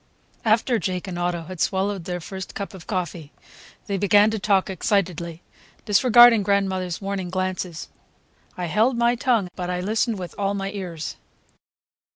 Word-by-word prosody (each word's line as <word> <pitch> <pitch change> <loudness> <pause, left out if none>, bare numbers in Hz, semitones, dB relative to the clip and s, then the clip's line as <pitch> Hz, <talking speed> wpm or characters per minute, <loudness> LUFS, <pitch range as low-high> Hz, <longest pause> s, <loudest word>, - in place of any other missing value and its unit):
After 230 +2 +2
Jake 185 0 -3
and 175 -2 -5
Otto 175 -1 -1
had 185 +1 -9
swallowed 195 -2 0
their 180 -1 -3
first 190 +2 -8
cup 200 +1 -5
of 185 -3 -12
coffee, 175 -5 -4 0.5
they 200 - -2
began 205 +2 +5
to 220 - -2
talk 195 -1 +2
excitedly, 175 -3 -1 0.4
disregarding 235 +1 +7
grandmother's 190 -3 0
warning 195 -2 -3
glances. 185 -2 -3 0.7
I 180 - -2
held 220 +9 +2
my 235 0 +3
tongue, 240 -6 +1
but 180 -1 -4
I 180 0 -1
listened 220 +4 0
with 180 -2 -7
all 200 0 0
my 195 0 -3
ears. 180 -6 -6
190 Hz, 155 wpm, -23 LUFS, 180-210 Hz, 0.7 s, disregarding